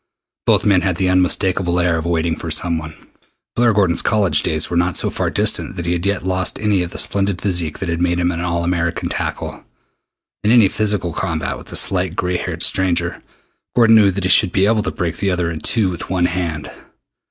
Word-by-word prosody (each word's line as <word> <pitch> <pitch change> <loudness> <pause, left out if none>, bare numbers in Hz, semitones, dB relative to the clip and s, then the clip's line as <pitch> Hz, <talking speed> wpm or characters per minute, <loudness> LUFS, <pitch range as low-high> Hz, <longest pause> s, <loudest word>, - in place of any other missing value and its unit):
Both - - +3
men 100 -3 +4
had 90 -1 -1
the 95 0 +1
unmistakable 90 -1 +1
air 90 -1 +2
of 80 +1 -3
waiting 85 -1 0
for 85 - -6
someone. 80 0 -2 0.6
Blair 120 -1 +3
Gordon's 95 -5 +2
college 100 -8 +2
days 80 -1 0
were 85 - -4
not 90 0 +1
so - - 0
far - - -1
distant - - 0
that 85 - -5
he 85 - -1
had 90 +2 -2
yet 100 -2 -1
lost 90 -1 -1
any 105 -3 +1
of 90 - -3
the - - -8
splendid 100 -2 0
physique 85 -6 -1
that 95 - -5
had 85 0 -2
made 90 0 +1
him 90 0 +1
an 85 -1 -4
All 85 -1 -1
American 85 -1 -1
tackle. - - -4 0.8
In 105 - +2
any 115 -4 +6
physical 105 -6 -1
combat 85 -3 -2
with - - -12
the - - -7
slight 90 -2 +1
gray 90 0 -1
haired - - -3
stranger, 95 -2 0 0.5
Gordon 115 -2 +6
knew 105 -3 +6
that 95 0 -3
he 95 - 0
should 90 0 +4
be 95 +1 +2
able 110 +1 +2
to - - -3
break 85 -2 -3
the 100 - -1
other 90 -2 -1
in 80 - -5
two 105 -1 0
with 85 - -7
one 90 -2 +1
hand. 85 -4 -3
90 Hz, 220 wpm, -18 LUFS, 85-95 Hz, 0.8 s, any